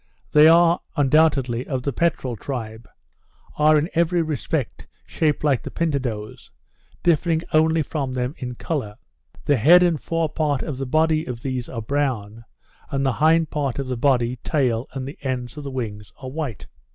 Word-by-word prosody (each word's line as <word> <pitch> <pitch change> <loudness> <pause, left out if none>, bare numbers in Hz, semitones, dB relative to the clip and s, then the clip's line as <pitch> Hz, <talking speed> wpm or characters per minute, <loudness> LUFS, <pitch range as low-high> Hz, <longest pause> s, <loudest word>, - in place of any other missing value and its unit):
They 150 +1 +7
are, 170 +1 +5 0.2
undoubtedly, 135 -4 +2
of 130 -3 -3
the 140 - -2
peterel 135 -5 0
tribe; 115 -2 -6 0.7
are 155 +1 +5
in 150 +2 +1
every 170 0 +2
respect 155 -3 -3 0.2
shaped 150 -2 0
like 140 -5 +2
the - - -7
pintadoes, 130 -10 -3 0.5
differing 165 0 +2
only 160 0 +3
from 140 -2 -3
them 125 +2 -2
in 125 -2 -5
colour. 130 - -4 0.5
The 145 - +3
head 170 +10 +7
and 170 -4 +1
fore 165 -1 -1
part 145 -3 -1
of 145 -5 -5
the 135 - -3
body 155 +2 +2
of 120 -2 -7
these 130 -3 -3
are 115 -3 -5
brown; 115 -5 -2 0.5
and 135 -2 -1
the 135 - +2
hind 160 0 +4
part 140 -4 -2
of 140 - -2
the 130 0 -3
body, 125 -1 +1
tail, 125 -4 0
and 135 -1 -5
the 140 - -9
ends 125 -1 -4
of 150 - -7
the 140 - -5
wings, 105 -6 -5
are 130 - -8
white. 145 -7 -5
140 Hz, 175 wpm, -22 LUFS, 125-155 Hz, 0.7 s, They